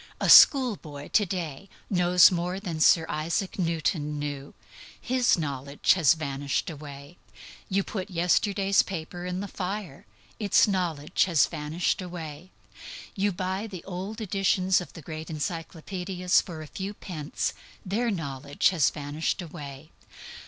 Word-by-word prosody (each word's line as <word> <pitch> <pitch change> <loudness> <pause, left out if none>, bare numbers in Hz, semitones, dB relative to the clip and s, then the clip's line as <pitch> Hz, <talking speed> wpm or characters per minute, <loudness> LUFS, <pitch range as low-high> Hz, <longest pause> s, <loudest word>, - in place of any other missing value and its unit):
A - - 0
schoolboy 195 - +6
to 210 -3 +3
day 175 0 -5 0.2
knows 180 -2 +5
more 180 +1 -2
than 175 -6 -5
Sir 160 +1 +5
Isaac 170 +6 -2
Newton 160 -3 -1
knew; 145 -1 -5 0.4
his 250 -3 +2
knowledge 140 -2 +1
has 165 -5 +4
vanished 140 0 -2
away. 145 +1 -10 0.5
You 195 +1 +1
put 195 -1 -5
yesterday's 195 +3 +1
newspaper 175 0 -6
in 180 +1 -3
the 200 - -4
fire: 190 - -5 0.3
its 205 -1 +4
knowledge 175 -7 0
has 170 -5 +4
vanished 160 +4 -2
away. 170 -2 -8 0.6
You 205 0 0
buy 190 +3 -3
the 185 -5 -8
old 195 +4 -6
editions 190 -2 +2
of 180 - -9
the 165 - -11
great 155 +1 -7
encyclopædias 175 +3 -1
for 160 -3 -8
a - - -8
few 195 +6 -6
cents: 155 -6 -3 0.3
their 225 +6 0
knowledge 145 -7 0
has 170 -7 +3
vanished 145 +2 -3
away. 150 -3 -9
175 Hz, 135 wpm, -27 LUFS, 150-190 Hz, 0.6 s, schoolboy